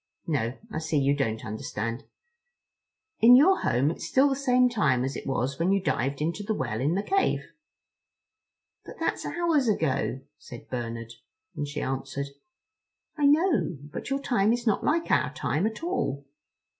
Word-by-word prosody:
No, 130 -6 -1
I 155 - -3
see 160 -1 -1
you 140 0 +3
don't 115 -5 -2
understand. 115 +3 -4 1.1
In 240 +2 +8
your 365 +9 +6
home 135 +5 +1
it's 165 - -6
still 265 +10 +4
the 270 - 0
same 255 -2 +3
time 140 - +1
as 135 +1 -3
it - - -6
was 135 +2 -1
when 175 +3 +2
you 195 - +3
dived 140 -6 -1
into 170 +6 -2
the 215 +1 -2
well 120 - -3
in 150 +6 +1
the 200 - 0
cave." 390 - 0 1.3
"But - - -10
that's - - -1
hours 330 -7 +1
ago," 155 -9 0 0.2
said 120 -4 -12
Bernard; 115 -2 -5 0.4
and 145 - -3
she 150 - -4
answered: 135 +1 -3 0.9
"I 295 -2 +3
know. 290 - +2
But 145 - -8
your 275 0 0
time 220 -6 +2
is 240 0 -3
not 220 - +1
like 330 +2 +1
our - - +2
time 175 +8 0
at 220 +8 -6
all." 145 - -2
160 Hz, 170 wpm, -27 LUFS, -, 1.3 s, In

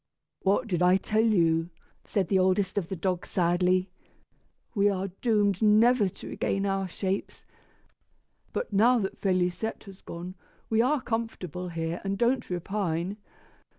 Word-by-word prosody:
"What 195 +1 +2
did 180 -5 -1
I 180 +1 +5
tell 215 +3 +1
you?" 165 -6 +2 0.4
said 195 -4 0
the 190 +1 +2
oldest 185 +1 +2
of 195 -5 -1
the 190 - -4
dogs 180 0 -2
sadly. 180 +1 +1 0.8
"We 205 -2 +3
are 195 0 -2
doomed 205 -5 +2
never 215 0 +5
to - - -11
regain 195 0 -1
our 195 -1 0
shapes; 190 +2 -4 1.1
but, - - -4
now 235 +5 +5
that 195 -4 -3
Félisette 185 +3 0
has 195 -2 -13
gone, 175 +2 -7 0.4
we 220 0 +4
are 270 +3 +2
comfortable 180 -6 -4
here 165 0 -3
and 195 0 -2
don't 240 +3 +1
repine. 180 0 -2
195 Hz, 145 wpm, -28 LUFS, 180-210 Hz, 1.1 s, I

